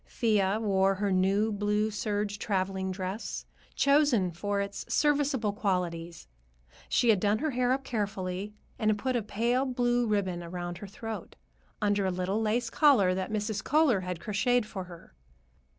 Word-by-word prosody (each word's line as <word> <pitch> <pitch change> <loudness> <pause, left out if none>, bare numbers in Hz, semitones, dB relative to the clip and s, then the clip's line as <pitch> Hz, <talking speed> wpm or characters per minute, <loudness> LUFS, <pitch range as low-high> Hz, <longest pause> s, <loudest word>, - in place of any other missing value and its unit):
Thea 210 -4 +1
wore 195 -3 +2
her 200 +1 -1
new 195 +4 +2
blue 210 +1 0
serge 205 0 -2
traveling 190 -2 -1
dress, 190 +3 -4 0.3
chosen 280 -10 +3
for 200 +4 -2
its 200 0 -4
serviceable 280 -7 +2
qualities. 175 -5 -2 0.6
She 240 - +3
had 210 -4 +5
done 205 +2 +2
her 310 +6 -1
hair 250 0 +1
up 270 +1 0
carefully, 200 -3 -3 0.2
and 215 - +2
had 215 - +2
put 255 +4 -1
a 240 - +1
pale 235 +5 0
blue 245 -2 +1
ribbon 190 -4 0
around 175 0 -5
her 205 - -8
throat, 220 +2 -7 0.5
under 205 -1 +2
a 190 - +1
little 185 +4 -1
lace 225 +2 0
collar 245 - +5
that 185 0 -3
Mrs. 210 -1 -2
Kohler 295 -8 +3
had 180 -2 -4
crocheted 235 +3 +1
for 190 -3 -6
her. 170 -2 -13
205 Hz, 160 wpm, -29 LUFS, 190-230 Hz, 0.6 s, had